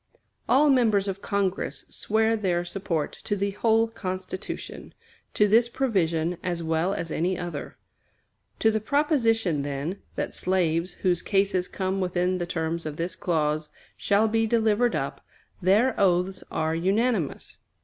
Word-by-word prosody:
All 285 Hz, +3 st, +5 dB
members 220 Hz, -6 st, +3 dB
of 195 Hz, 0 st, -4 dB
Congress 200 Hz, -2 st, -2 dB
swear 220 Hz, +1 st, +1 dB
their 180 Hz, -5 st, 0 dB
support 175 Hz, -4 st, -2 dB
to 205 Hz, -, -1 dB
the 200 Hz, 0 st, -1 dB
whole 225 Hz, +2 st, +2 dB
Constitution 185 Hz, -4 st, -6 dB, 0.4 s
to 210 Hz, -, +4 dB
this 230 Hz, +3 st, +4 dB
provision 175 Hz, -10 st, 0 dB
as 175 Hz, -2 st, -2 dB
well 165 Hz, +4 st, 0 dB
as 165 Hz, -1 st, -4 dB
any 180 Hz, +4 st, 0 dB
other. 175 Hz, -1 st, -6 dB, 0.8 s
To 220 Hz, -, +5 dB
the 220 Hz, -, 0 dB
proposition, 225 Hz, -, +1 dB
then, 145 Hz, +6 st, -4 dB
that -, -, -3 dB
slaves 175 Hz, -1 st, 0 dB
whose 175 Hz, -2 st, +3 dB
cases 195 Hz, -2 st, +1 dB
come 190 Hz, 0 st, -2 dB
within 180 Hz, 0 st, 0 dB
the 175 Hz, -, -2 dB
terms 165 Hz, -1 st, -2 dB
of 150 Hz, -1 st, -6 dB
this 170 Hz, +1 st, -3 dB
clause 155 Hz, -3 st, -1 dB, 0.3 s
"shall 205 Hz, +2 st, +2 dB
be 225 Hz, +1 st, +1 dB
delivered 225 Hz, +1 st, +2 dB
up," -, -, -3 dB, 0.4 s
their 210 Hz, +8 st, +4 dB
oaths 185 Hz, 0 st, +2 dB
are 160 Hz, 0 st, -1 dB
unanimous. 195 Hz, -, 0 dB
190 Hz, 140 wpm, -26 LUFS, 170-220 Hz, 0.8 s, All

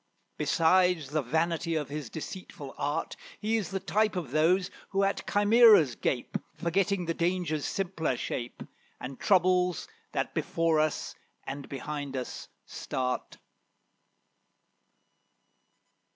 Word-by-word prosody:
Besides 175 Hz, -3 st, +3 dB
the 155 Hz, 0 st, +1 dB
vanity 165 Hz, +5 st, 0 dB
of 150 Hz, -3 st, -2 dB
his 145 Hz, -4 st, -5 dB
deceitful 160 Hz, -4 st, -8 dB
art, 145 Hz, +3 st, -2 dB, 0.2 s
He 220 Hz, +2 st, 0 dB
is 215 Hz, -4 st, -1 dB
the 195 Hz, -, -2 dB
type 210 Hz, +2 st, +1 dB
of 165 Hz, -9 st, -4 dB
those 180 Hz, +5 st, +3 dB, 0.2 s
who 195 Hz, 0 st, +1 dB
at 195 Hz, 0 st, -1 dB
chimeras 205 Hz, -, +6 dB
gape, 125 Hz, +1 st, -2 dB, 0.2 s
Forgetting 190 Hz, +2 st, 0 dB
danger's 170 Hz, -2 st, -1 dB
simpler 175 Hz, -9 st, -1 dB
shape, 120 Hz, 0 st, -4 dB, 0.4 s
And 130 Hz, +1 st, -7 dB
troubles 180 Hz, -2 st, +3 dB, 0.3 s
that -, -, -1 dB
before 165 Hz, -2 st, +1 dB
us 155 Hz, 0 st, -1 dB, 0.3 s
and 135 Hz, +1 st, -6 dB
behind 140 Hz, 0 st, -5 dB
us 125 Hz, -, -5 dB, 0.2 s
start. 125 Hz, -1 st, -3 dB
165 Hz, 110 wpm, -29 LUFS, 145-185 Hz, 0.4 s, chimeras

